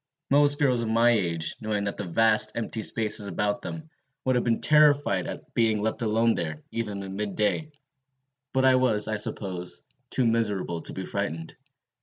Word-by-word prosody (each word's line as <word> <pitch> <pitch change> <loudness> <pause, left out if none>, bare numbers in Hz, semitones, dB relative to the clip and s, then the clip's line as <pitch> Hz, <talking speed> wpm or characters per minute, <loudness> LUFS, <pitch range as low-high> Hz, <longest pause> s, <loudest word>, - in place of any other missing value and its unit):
Most 145 0 +4
girls 130 -5 +2
of 115 - -2
my 115 +2 +4
age, 85 -7 0
knowing 105 -2 -1
these 100 - -2
vast 110 +5 +3
empty 115 -1 -3
spaces 105 -2 0
about 105 0 -1
them, 160 -1 -8 0.3
would 130 - +2
have 125 - +1
been 115 -1 +1
terrified 145 -10 +3
at - - -8
being 110 -2 +2
left 110 +3 -2
alone 115 +1 +2
there, 80 -2 -4
even 105 -4 -4
in 95 0 -7
mid 100 -1 -3
day. 105 +9 0 0.8
But 130 0 +2
I 130 - +6
was, 110 -5 +2
I 110 0 -1
suppose, 90 -4 -4 0.3
too 130 - +1
miserable 105 -7 0
to - - -6
be - - -5
frightened. 80 +2 -4
110 Hz, 175 wpm, -26 LUFS, 100-120 Hz, 0.8 s, I